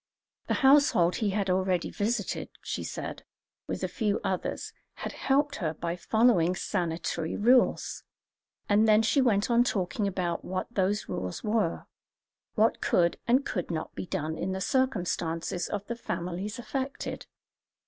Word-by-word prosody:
The - - +1
household 265 -11 +5
he 215 -3 0
had 200 0 0
already 185 -1 +1
visited, 210 0 -2
she - - -3
said, - - -5 0.4
with - - -4
a - - +1
few 210 -4 0
others, 185 - -2 0.2
had - - -5
helped 285 +1 +1
her 160 -4 -2
by 170 +2 -3
following 185 -3 +3
sanitary 170 -3 -2
rules; 245 +4 +3 0.7
and 210 +2 +4
then 215 0 +5
she 270 +5 +3
went 220 -3 +2
on 235 +1 +5
talking 200 -2 -1
about 180 -3 -2
what 185 0 -2
those 200 +1 0
rules 90 -1 -4
were, 210 -5 0 0.7
what 220 +1 +3
could 170 -1 +2
and 255 +4 +3
could 180 - -3
not 160 -2 -4
be - - -6
done 160 -4 -3
in 190 - -1
the 190 - -3
circumstances 180 -8 -1
of 205 -1 -3
the 235 - -4
families 190 -1 -4
affected. 265 +3 -4
200 Hz, 150 wpm, -28 LUFS, 175-230 Hz, 0.7 s, household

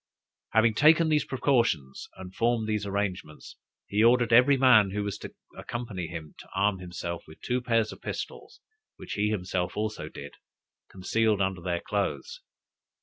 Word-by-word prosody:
Having 110 0 +4
taken 160 +6 +5
these 150 -1 +2
precautions 115 - 0
and 95 0 -9
formed 115 0 0
these 105 -2 -1
arrangements, 95 -6 -4 0.3
he 105 +2 +1
ordered 120 0 +4
every 130 +4 +6
man 125 -6 +6
who 100 +2 -3
was 100 -1 -3
to - - -9 0.2
accompany 110 -8 -5
him 80 -3 -8
to - - -12
arm 95 0 +1
himself 85 -1 -6
with 80 - -14
two 125 +1 -1
pair 115 -2 +2
of 110 - -7
pistols, - - -7 0.3
which - - -8
he 105 +1 0
himself 90 -3 -2
also 110 0 -3
did, - - -10 0.6
concealed 105 +3 0
under 95 -2 -1
their 85 -1 -2
clothes. 470 - -3
105 Hz, 155 wpm, -27 LUFS, 95-120 Hz, 0.6 s, every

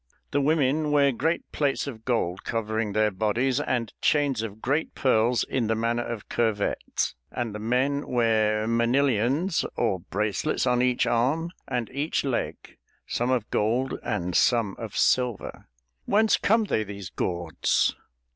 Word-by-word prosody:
The 145 - +2
women 150 0 +2
wear 140 -1 +4
great 160 +7 0
plates 145 -2 0
of 115 -6 -8
gold 95 -7 -1
covering 110 -2 -2
their 110 0 +2
bodies, 115 +7 0
and 120 -6 -2
chains 140 -6 +2
of 110 -1 -6
great 145 +7 -1
pearls 120 -2 +2
in 125 -4 -1
the 110 - +1
manner 115 +2 0
of 115 -3 -6
curvettes; 110 -3 -1 0.2
and 120 -3 -3
the 105 - -5
men 130 +6 0
wear 110 -3 +2
manilions 125 - +1
or 100 -6 0
bracelets 105 - -1
on 125 -1 +2
each 125 -1 +2
arm 145 +9 +1 0.2
and 125 -3 -2
each 140 +4 -1
leg, 135 -4 -3 0.3
some 120 +1 -1
of 125 -4 0
gold 120 +5 0
and 90 0 -2
some 115 -5 +3
of 110 -4 -6
silver." 125 -4 0 0.4
"Whence 215 +2 +4
come 225 +2 +2
they, 110 - 0
these 100 -3 -8
gauds?" 85 -3 0
120 Hz, 145 wpm, -26 LUFS, 110-135 Hz, 0.4 s, wear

